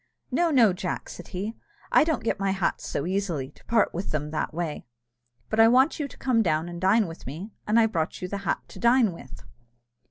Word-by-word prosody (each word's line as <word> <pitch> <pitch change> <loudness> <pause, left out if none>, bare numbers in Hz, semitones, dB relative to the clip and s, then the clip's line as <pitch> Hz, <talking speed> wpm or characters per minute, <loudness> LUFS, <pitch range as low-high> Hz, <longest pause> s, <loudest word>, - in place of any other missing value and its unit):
"No, 345 -1 +2
no, 235 - +5
Jack," 180 0 -4
said 175 - -9
he, 200 +4 -4 0.4
"I - - +6
don't 310 -7 -1
get 225 - -1
my 195 0 0
hats 190 -2 -1
so 140 - -2
easily, 175 -8 -2
to - - -23
part 225 -2 +2
with 180 +4 -4
them 150 0 -2
that 155 - -2
way; 165 -4 -4 0.6
but 220 - -2
I 225 - +8
want 260 +7 +4
you 295 - -1
to - - -15
come 250 -4 +2
down 160 -4 +1
and 175 0 -7
dine 205 +4 +4
with 165 -5 -9
me, 170 - -7 0.2
and 215 +2 +4
I 225 - +5
brought 170 -7 -2
you 180 - -4
the 200 +2 -4
hat 200 - -1
to - - -11
dine 235 -2 +4
with." 140 -6 -12
195 Hz, 225 wpm, -26 LUFS, 170-230 Hz, 0.6 s, I